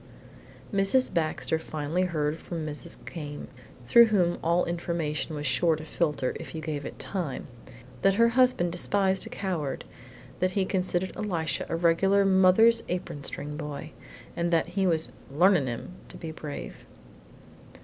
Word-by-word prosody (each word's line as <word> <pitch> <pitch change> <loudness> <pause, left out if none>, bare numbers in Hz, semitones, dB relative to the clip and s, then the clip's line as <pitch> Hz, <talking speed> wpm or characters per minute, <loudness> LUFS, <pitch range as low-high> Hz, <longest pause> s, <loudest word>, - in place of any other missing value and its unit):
IV 200 - +2
Mrs. 255 +7 +3
Baxter 160 0 0
finally 155 +2 -2
heard 155 -2 -1
from 165 -3 -5
Mrs. 155 +3 -6
Came, 145 -3 -7 0.4
through 235 - +8
whom 180 -5 +2
all 170 +2 +2
information 170 -2 -2
was 145 0 -4
sure 160 +5 +3
to 155 0 -8
filter 150 -6 -1
if - - -8
you - - -3
gave 150 -3 -3
it - - -7
time, 170 -10 -3 0.6
that 195 0 +4
her 230 +2 +5
husband 245 -8 +3
despised 190 +2 +1
a - - -8
coward, 165 -9 -3 0.6
that 185 0 +1
he 195 -1 +1
considered 185 -1 -1
Elisha 170 -7 -2
a - - -1
regular 190 +4 +3
mother's 190 +5 +5
apron 175 -5 -4
string 145 +1 -5
boy, 150 -2 -6 0.4
and 170 0 0
that 165 +1 +2
he 190 +1 0
was 160 -2 +1 0.2
"learnin'" 175 -1 +4
him 120 +7 -5 0.2
to - - -10
be 165 -2 -6
brave. 150 -2 -8
170 Hz, 155 wpm, -27 LUFS, 155-190 Hz, 0.6 s, through